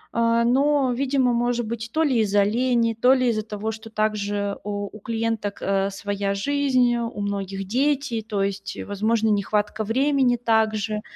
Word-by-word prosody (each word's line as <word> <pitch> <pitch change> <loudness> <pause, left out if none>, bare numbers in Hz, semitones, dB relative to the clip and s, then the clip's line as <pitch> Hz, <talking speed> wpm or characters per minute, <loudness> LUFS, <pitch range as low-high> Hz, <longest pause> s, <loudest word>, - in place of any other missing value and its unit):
Э, 230 0 +3
но, 275 +2 +3
видимо, 260 -1 +1
может 240 0 0
быть, 230 0 -5
то 320 - +1
ли 265 -6 +2
из-за 205 -2 +3
лени, 235 +2 +1
то 250 +3 +6
ли 255 -2 +2
из-за 215 -2 0
того, 210 +1 -4
что 220 0 -10
также 205 -2 -1
у 205 0 -3
у 215 - -11
клиенток, 225 -1 -2
э, 195 0 +1
своя 200 0 -2
жизнь, 255 +1 +2
у 235 -2 -4
многих 195 -1 -3
дети, 270 +1 0
то 200 -3 -1
есть, 195 0 -4
и, - - -6
возможно, 220 +2 0
нехватка 210 +1 0
времени 260 +2 +2
также. 220 -2 0
225 Hz, 165 wpm, -23 LUFS, 205-245 Hz, -, то